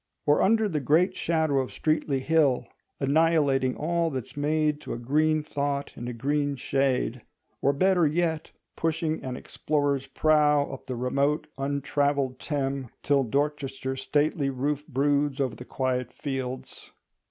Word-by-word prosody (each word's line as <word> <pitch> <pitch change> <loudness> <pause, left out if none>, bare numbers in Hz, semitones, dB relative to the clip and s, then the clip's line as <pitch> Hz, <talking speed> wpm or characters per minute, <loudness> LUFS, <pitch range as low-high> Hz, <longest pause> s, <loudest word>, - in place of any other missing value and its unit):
Or 145 0 +4
under 220 +2 +3
the 160 -6 -1
great 165 +8 +2
shadow 160 -4 +1
of 130 - -2
Streatley 150 -3 0
Hill, 150 -3 +2 0.3
"annihilating 140 -3 +2
all 170 +2 0
that's 130 -6 -6
made 150 +1 0
to - - -5
a - - -4
green 155 +5 +1
thought 140 -1 -2
in 120 - -6
a - - -3
green 145 +4 0
shade"; 130 -2 0 0.4
or 140 - +4
better 175 +3 +3
yet, 160 0 -1 0.3
pushing 160 -1 -1
an 130 -1 -4
explorer's 145 -3 -1
prow 150 -2 +3
up 135 - -8
the 130 - -4
remote 140 +5 0
untravelled 140 -1 0
Thame, 135 -4 -2
till 140 -1 +3
Dorchester's 135 0 -2
stately 145 0 +1
roof 140 +3 -2
broods 145 0 +1
over 130 -5 0
the 125 - -10
quiet 125 -2 -2
fields. 130 -2 -5
145 Hz, 140 wpm, -27 LUFS, 135-155 Hz, 0.4 s, Or